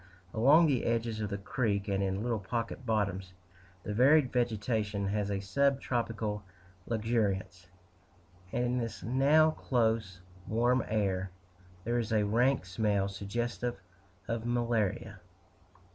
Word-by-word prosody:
Along 140 +9 +6
the 135 -6 +1
edges 115 -1 -1
of 105 - -2
the 100 - -3
Creek, 100 -1 -1
and 100 -1 0
in 95 +1 -1
little 120 -2 -1
pocket 115 +5 -4
bottoms, 100 -4 -1 0.5
the 105 - -4
varied 135 +4 +4
vegetation 110 -4 0
has 105 0 -1
a 100 -1 -1
sub 140 +8 +1
tropical 115 -5 -2 0.5
luxuriance, 105 -5 -1 0.8
and 120 - 0
in 125 +1 0
this 115 -2 -5
now 145 +6 +4
close, 110 -9 -1 0.3
warm 120 +2 +2
air, 95 -3 0 0.5
there 120 +3 0
is 115 -1 -3
a 105 -2 +2
rank 120 +2 +2
smell 100 +1 0
suggestive 120 +4 -3 0.5
of 115 -1 -2
malaria. 115 -3 -1
110 Hz, 130 wpm, -31 LUFS, 100-120 Hz, 0.8 s, Along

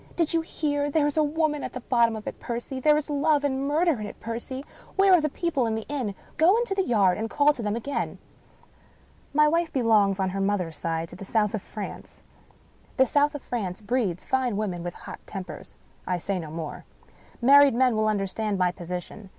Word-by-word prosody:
" - - -23
Do 335 - +3
you 330 +1 +1
hear? 290 -3 -1
There 295 0 +2
is 295 - 0
a 310 - +4
woman 300 -1 0
at - - -5
the 255 - -4
bottom 235 -2 +2
of 215 - -7
it, - - -6
Percy! 240 +2 -5
There 300 +3 +4
is 300 - -2
love 295 0 +2
and 275 -1 0
murder 310 -2 +2
in 210 - -4
it, - - -10
Percy! 240 +4 -5 0.3
Where 390 -1 +5
are 355 - +6
the 305 - 0
people 280 -6 -1
of 220 - -1
the 220 - -3
inn? 255 -9 -3 0.2
Go 345 +7 +5
into 470 -4 0
the 390 - +1
yard, 205 - +2
and 225 +1 -2
call 295 +4 +4
to 255 - -7
them 210 -1 -1
again." 275 +5 -3 1.1
My 300 +1 +4
wife 335 +2 +1
belongs, 215 -6 +3
on 190 -1 0
her 195 +1 -2
mother's 190 -5 -1
side, 165 0 -2
to - - -10
the 185 - -9
South 210 +1 +1
of 215 - -2
France. 210 +1 -8 0.7
The 265 - +6
South 290 +3 +2
of 290 - -6
France 195 -7 -3
breeds 210 -5 -1
fine 255 -5 0
women 190 -5 -2
with 175 0 -5
hot - - -9
tempers. 190 -3 -8 0.3
I 180 - 0
say 190 +2 -2
no 160 -3 -6
more. 160 -1 -6 0.6
Married 280 +1 +7
men 250 -1 +3
will 215 0 +1
understand 205 0 -1
my 180 -1 +2
position. 180 +3 -7
235 Hz, 215 wpm, -26 LUFS, 200-290 Hz, 1.1 s, Married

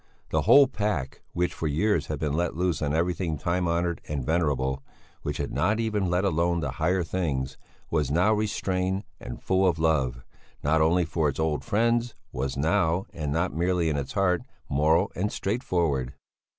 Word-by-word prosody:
The - - +2
whole 140 0 +7
pack, 105 - -2
which 90 0 0
for 80 - -3
years 105 +9 +1
had 75 - -3
been 75 -1 -1
let 85 +1 0
loose 90 -2 0
on 75 -1 0
everything 85 0 0
time 90 +4 0
honoured 85 0 0
and 70 -4 -3
venerable, 70 -5 0 0.4
which 75 -1 -3
had 70 - -3
not 110 +2 +1
even 105 -5 0
let 90 +3 +1
alone 85 -1 +1
the 70 -5 -2
higher 85 +6 +1
things, 75 -7 -2 0.4
was 75 -4 +1
now 90 +9 +3
restrained 95 -2 -1 0.2
and - - -8
full 95 0 +3
of 85 -2 +2
love 70 -7 +1 0.4
not 80 +2 +3
only 85 +3 +3
for 80 -2 0
its 70 - -5
old 80 -1 0
friends 115 +1 +1 0.2
was 65 +1 -3
now 85 +3 +1
and 75 -3 -3
not 85 +4 0
merely 85 0 +1
in 75 - 0
its 70 -2 -3
heart 90 -3 +2 0.3
moral 80 +7 +2
and 105 +4 -1
straightforward. 85 - -1
85 Hz, 175 wpm, -26 LUFS, 75-95 Hz, 0.4 s, whole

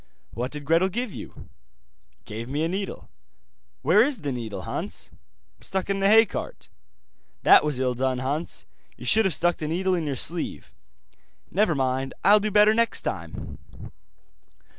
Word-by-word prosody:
'What 125 +2 -3
did 150 -1 -7
Gretel 165 +5 +3
give 235 +2 -3
you?' - - -10 0.8
'Gave 115 +3 -7
me 145 +3 -1
a - - +1
needle.' 195 +3 -5 0.8
'Where 175 +9 +5
is 260 -6 -1
the 145 - -2
needle, 115 -4 -5
Hans?' - - -5 0.5
'Stuck 190 0 -3
in 195 - -1
the 195 - +3
hay 225 +2 +7
cart.' 185 - -7 0.7
'That - - +7
was 150 -4 -1
ill 130 -1 +1
done, 130 +1 -1
Hans. 140 +6 -3 0.3
You - - -10
should 220 -1 +4
have 190 - +2
stuck 175 0 +1
the 155 - -4
needle 185 +4 0
in 165 -4 -1
your 140 - -1
sleeve.' 165 +6 -2 0.8
'Never 195 -4 +2
mind, 130 0 -1
I'll 205 +2 +7
do 215 +1 -1
better 210 +1 +5
next 230 +1 +1
time. - - -6
170 Hz, 160 wpm, -25 LUFS, 135-200 Hz, 0.8 s, hay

